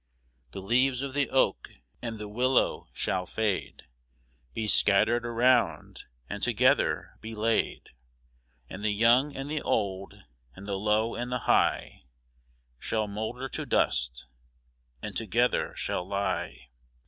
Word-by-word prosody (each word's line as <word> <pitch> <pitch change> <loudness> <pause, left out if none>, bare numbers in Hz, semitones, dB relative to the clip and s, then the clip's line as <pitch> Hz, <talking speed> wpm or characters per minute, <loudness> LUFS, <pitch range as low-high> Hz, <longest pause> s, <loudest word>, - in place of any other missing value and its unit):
The 95 +9 -8
leaves 125 +4 +2
of 140 -1 -4
the 140 -1 +1
oak 135 - +1 0.3
and 115 -2 -4
the 105 0 -6
willow 125 +5 +1
shall 90 -1 -2
fade, 105 -1 -2 0.7
Be 110 - -3
scattered 110 +3 +3
around, 120 -9 +1 0.2
and 100 +6 -6
together 125 +4 +1
be 110 0 -7
laid; 110 +1 -1 0.8
And 95 +8 -8
the 110 - +2
young 120 +7 +4
and 135 +1 -5
the 150 0 -2
old, 95 -2 -2 0.4
and 100 +2 -11
the 100 -1 -2
low 105 +2 +1
and 120 +1 -4
the 125 - 0
high, - - +1 0.7
Shall 110 -2 -1
moulder 110 +6 -4
to - - -4
dust, 60 0 0 0.8
and - - -6
together 115 +3 0
shall 90 - -2
lie. 100 -10 -2
110 Hz, 130 wpm, -28 LUFS, 100-125 Hz, 0.8 s, young